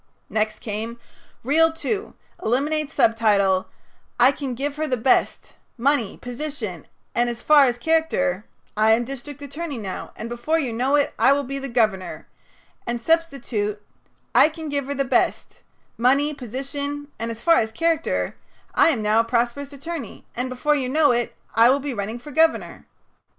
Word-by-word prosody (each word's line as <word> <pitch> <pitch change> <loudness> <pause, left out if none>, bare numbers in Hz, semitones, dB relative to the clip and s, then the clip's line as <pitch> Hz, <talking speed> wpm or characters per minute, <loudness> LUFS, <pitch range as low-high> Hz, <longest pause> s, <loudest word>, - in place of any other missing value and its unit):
'" - - -43
Next 215 0 -2
came: 225 +2 -5 0.4
"Reel 320 +6 +4
Two 405 +6 -4 0.3
Eliminate 290 +6 0
subtitle, 200 -4 +2 0.5
'I 250 +3 +7
can 275 -3 -5
give 280 +3 -3
her 310 0 -1
the 255 - 0
best 250 +3 +1 0.2
money, 245 -3 +1
position, 245 - -5 0.3
and, 240 0 +2
as 235 0 -6
far 295 -2 +7
as 245 -2 0
character 280 - +1 0.3
I 215 +1 +4
am 235 +2 +2
district 275 +2 -8
attorney 290 0 -5
now, 195 -4 -6
and 225 - -6
before 240 +7 -1
you 265 -7 -2
know 255 +5 +1
it 285 -1 +2
I 275 - +6
will 285 0 0
be 275 +1 -4
the 275 0 -5
governor,' 215 -6 0 0.6
and 240 0 -1
substitute: 245 -9 0 0.5
'I - - +7
can 320 -1 -7
give 285 -2 -2
her 285 - -3
the 275 0 0
best - - 0 0.4
money, 275 +5 +3
position, 280 +3 -5
and, 230 - -3
as 230 -1 -6
far 335 -1 +5
as 220 -1 +1
character 330 +4 0 0.4
I - - +5
am 245 -10 +1
now 210 +1 +3
a - - +4
prosperous 240 +4 -1
attorney, 280 -3 -7
and 250 +2 -2
before 255 +4 +1
you 265 -4 -1
know 295 0 +4
it 240 0 -1 0.2
I 230 +2 +6
will 275 +2 +3
be 280 -1 -4
running 215 +1 -4
for 270 +5 -11
governor.'" 320 +3 +1
260 Hz, 170 wpm, -23 LUFS, 230-290 Hz, 0.6 s, I